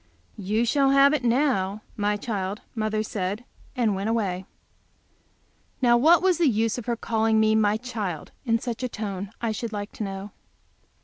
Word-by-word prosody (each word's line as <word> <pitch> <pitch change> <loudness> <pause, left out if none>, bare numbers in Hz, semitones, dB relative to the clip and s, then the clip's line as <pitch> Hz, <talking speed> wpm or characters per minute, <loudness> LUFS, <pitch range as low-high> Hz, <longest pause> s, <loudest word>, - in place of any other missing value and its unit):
"You 210 +4 0
shall 275 +3 +3
have 275 +1 +6
it 300 - 0
now, 230 -6 +1
my 205 0 0
child," 200 -2 -3
mother 215 -1 -1
said, 205 +1 -3 0.3
and 235 -5 +2
went 195 +3 -2
away. 190 -5 -1 1.3
Now 240 -2 +5
what 325 +9 +5
was 370 -3 +3
the 335 - +4
use 225 +1 0
of 245 - -10
her 240 - +1
calling 225 -1 +1
me 220 0 +4
"my 215 -1 +3
child" 215 - -5
in 230 -3 +2
such 235 0 -5
a 255 - -2
tone, 200 -3 -5
I 230 -2 0
should 220 +1 -4
like 205 0 -4
to - - -5
know. 195 0 -5
220 Hz, 175 wpm, -25 LUFS, 205-245 Hz, 1.3 s, have